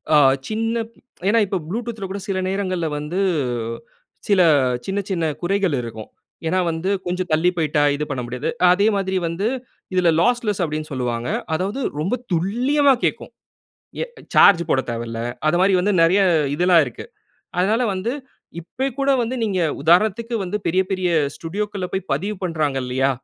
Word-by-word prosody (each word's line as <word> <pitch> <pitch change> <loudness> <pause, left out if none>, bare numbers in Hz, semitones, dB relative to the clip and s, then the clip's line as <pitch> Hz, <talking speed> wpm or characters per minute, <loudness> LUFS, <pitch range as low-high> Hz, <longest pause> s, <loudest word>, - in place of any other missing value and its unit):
அ - - +8 0.3
சின்ன 225 +1 -1 0.5
ஏன்னா 230 +2 +4
இப்போ 195 - -1
Bluetoothல 225 -1 -4
கூட 200 - -4
சில 195 -2 -1
நேரங்கள்ல 185 -4 -1
வந்து 150 +6 -3 1.1
சில 200 -3 +4 0.4
சின்ன 195 +1 -1
சின்ன 170 -4 0 0.2
குறைகள் 190 -3 +1
இருக்கும். 110 -2 -8 0.4
ஏன்னா 185 +3 +1
வந்து 160 +4 -3 0.2
கொஞ்சம் 180 0 -2
தள்ளி 160 +3 +3
போய்ட்டா 150 -2 +1
இது 150 - -3
பண்ண 130 -3 -2
முடியாது. 125 +3 -3 0.2
அதே 200 +4 +3
மாதிரி 190 -1 -1
வந்து 175 +6 -2 0.5
இதுல 180 -2 +3
"லாஸ்லெஸ்" 235 -6 +1
அப்டின்னு 155 -1 -3
சொல்வாங்க. 120 -2 -2 0.2
அதாவது 190 +9 -2 0.2
ரொம்ப 190 +10 0 0.2
துல்லியமா 255 - +3
கேக்கும். - - -2 0.7
எ - - -3 0.3
சார்ஜ் 175 -4 +7
போடத் 130 -1 +1
தேவல்ல. 115 0 -4 0.3
அது 175 - +3
மாரி 195 0 +4
வந்து 200 +3 +1
நெறைய 180 +5 +4 0.3
இதெல்லாம் 175 -1 +5
இருக்கு. 125 - -8 0.5
அதனால 215 +7 +2
வந்து 195 +6 -2 0.5
இப்பய் 260 +9 -4
கூட 275 0 +2
வந்து 240 +3 -2
நீங்க 195 -4 -1 0.2
உதாரணத்துக்கு 215 +8 +3
வந்து 185 +3 -2
பெரிய 185 +3 +3
பெரிய 185 -2 0 0.3
ஸ்டுடியோக்கள்ல 200 +2 -4
போய் 190 - -3
பதிவு 195 +8 -2
பண்றாங்க 155 -5 -1
இல்லையா? 130 +2 +1
185 Hz, 150 wpm, -21 LUFS, 160-210 Hz, 1.1 s, அ